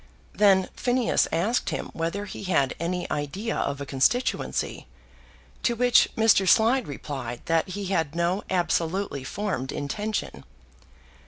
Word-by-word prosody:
Then 195 -3 +4
Phineas 245 -1 +1
asked 215 +9 0
him - - -4
whether 170 +5 -3
he 200 - -8
had 140 -8 +2
any 175 +2 -2
idea 150 +11 -2
of 140 0 -2
a 140 - -4
constituency, 220 - 0 0.7
to 235 - +1
which 245 +1 +4
Mr. 220 -4 +4
Slide 235 +4 +4
replied 130 -4 -6
that 165 +1 +1
he 200 +2 -5
had 160 -3 0
no 170 +3 0
absolutely 175 -3 0
formed 180 -5 -3
intention. 210 +9 -3
185 Hz, 130 wpm, -26 LUFS, 145-215 Hz, 0.7 s, Then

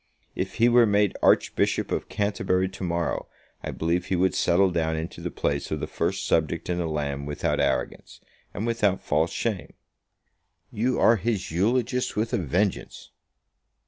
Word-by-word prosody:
If 95 +1 -4
he 115 +1 +4
were 120 -1 +5
made 105 -1 +2
Archbishop - - +2
of - - -2
Canterbury 100 -2 0
to 95 0 -8
morrow, 85 -1 -2 0.4
I - - -4
believe 85 +2 -1
he 95 - 0
would 95 +1 +2
settle 95 +2 +3
down 80 -2 0
into 80 +1 -5
the - - -3
place 70 -1 -2
of - - -2
the - - -2
first - - -2
subject 80 +2 0
in 90 - -1
the 85 - -1
land 70 -2 -3
without 75 - -1
arrogance, - - -2 0.3
and 105 - -4
without 105 -5 +1
false 80 +4 +1
shame." 110 -6 -3 1.0
"You 125 +4 0
are 115 - +5
his 110 -4 -2
eulogist 120 - 0
with 110 +2 -1
a - - +2
vengeance." 90 +4 -2
95 Hz, 165 wpm, -25 LUFS, 85-105 Hz, 1.0 s, were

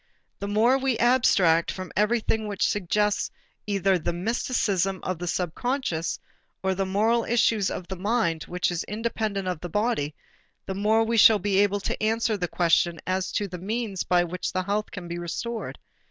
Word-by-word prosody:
The 200 - -4
more 230 +6 +3
we 260 -3 0
abstract 195 -9 +4
from 185 -1 -7
everything 220 +1 +1
which 200 -2 0
suggests 210 +2 0 0.4
either 195 -2 +2
the 155 - -1
mysticism 195 -1 0
of 185 -3 -3
the 175 - -4
subconscious 180 - -2 0.5
or 190 0 +1
the 190 0 -2
moral 220 +5 +2
issues 225 -3 +2
of 180 - -5
a - - -2
mind 190 -4 0
which 180 0 -1
is 175 -1 -2
independent 215 -2 -2
of 180 -3 -2
the 175 - -6
body, 185 -8 -1 0.5
the 190 - -3
more 215 +3 +2
we 230 +1 0
shall 220 0 +8
be 200 -1 +1
able 205 0 +2
to - - -3
answer 220 0 +1
the 180 -3 -2
question 170 -1 +2
as 185 0 -1
to 205 - 0
the 180 -2 -7
means 210 0 -3
by 175 -1 +3
which 180 +1 -3
health 200 +3 -1
can 180 -3 -8
be 170 0 -5
restored. 225 +7 -4
200 Hz, 175 wpm, -26 LUFS, 180-220 Hz, 0.5 s, shall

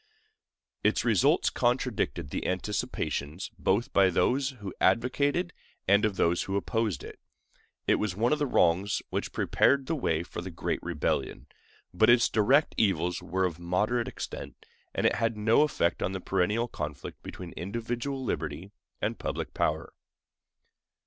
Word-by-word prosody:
Its - - +2
results - - +3
contradicted 120 - 0
the - - -2
anticipations 90 -4 -3
both 100 +5 +1
of 95 -2 +5
those 130 +8 +2
who 105 -8 -8
advocated 140 +9 +2 0.3
and 100 +2 +5
of 105 -2 0
those 85 -1 +1
who 95 - -3
opposed 105 - -1
it. - - -10 0.7
It - - +3
was 105 -4 -1
one 115 +7 +2
of 150 - 0
the 145 - +1
wrongs 95 -1 +2
which - - -2
prepared 140 -1 +2
the 165 - -1
way 85 - 0
for 85 - -7
the 95 - -6
great 85 - -3
rebellion; 85 -4 -2 0.5
but 110 +5 +4
its 120 0 +6
direct 130 +8 +3
evils 90 -4 +1
were 95 +1 0
of 85 -2 -3
moderate 105 +8 0
extent, - - -7 0.3
and - - 0
it - - +4
had 115 -1 0
no 110 +5 +4
effect 150 - +1
on 95 - -1
the 95 - -3
perennial 100 +6 0
conflict 75 - -6
between 90 -2 -8
individual 120 - -4
liberty 80 - -3 0.3
and - - -1
public - - -4
power. - - -1
100 Hz, 150 wpm, -29 LUFS, 90-120 Hz, 0.7 s, its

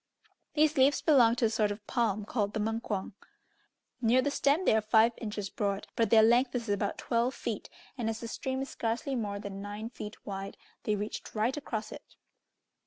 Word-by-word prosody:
These 310 0 +3
leaves 270 +2 +5
belonged 245 -7 +5
to 235 - +2
a - - +3
sort 215 -2 +2
of 205 0 -6
palm 215 -4 0
called 210 -2 -1
the - - 0
Mungkuang. 215 -2 -2 0.9
Near 245 +2 +4
the 285 - 0
stem 290 +6 +2
they - - +5
are 220 - +3
five 220 +2 +4
inches 210 -3 -4
broad, 200 -1 -1
but 230 - +2
their 220 -1 +7
length 245 +3 +4
is 235 -2 -2
about 205 0 0
twelve 240 +2 0
feet, - - -4 0.3
and 225 -2 0
as 225 0 -3
the 230 - -6
stream 265 +3 -3
is 270 - -7
scarcely 235 +4 -2
more 210 -5 -2
than 200 -1 -6
nine 205 +3 -6
feet 210 -2 -9
wide, 195 0 -5 0.3
they 210 - +2
reached 210 +2 -5
right 225 +4 +1
across 220 -7 -4
it. - - -12
225 Hz, 195 wpm, -30 LUFS, 210-245 Hz, 0.9 s, their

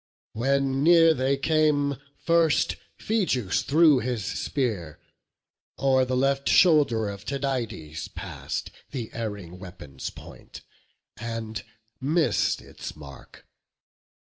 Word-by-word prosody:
When 135 +3 +1
near 165 0 +7
they 135 0 +1
came, 145 -1 +2 0.3
first 165 -2 +3 0.2
Phegeus 155 - 0
threw 155 -2 +5
his 120 -4 -3
spear; 105 - -2 0.8
O'er 130 -1 +3
the 130 0 -1
left 135 +1 +1
shoulder 145 - +4
of 100 -1 -6
Tydides 115 - -3
pass'd - - -6 0.2
The 120 -5 -5
erring 100 -6 -6
weapon's 90 -8 -8
point, - - -12 0.5
and 110 -2 -5 0.4
miss'd 155 +4 +1
its - - -9
mark. 70 -3 -13
130 Hz, 100 wpm, -26 LUFS, 110-145 Hz, 0.8 s, near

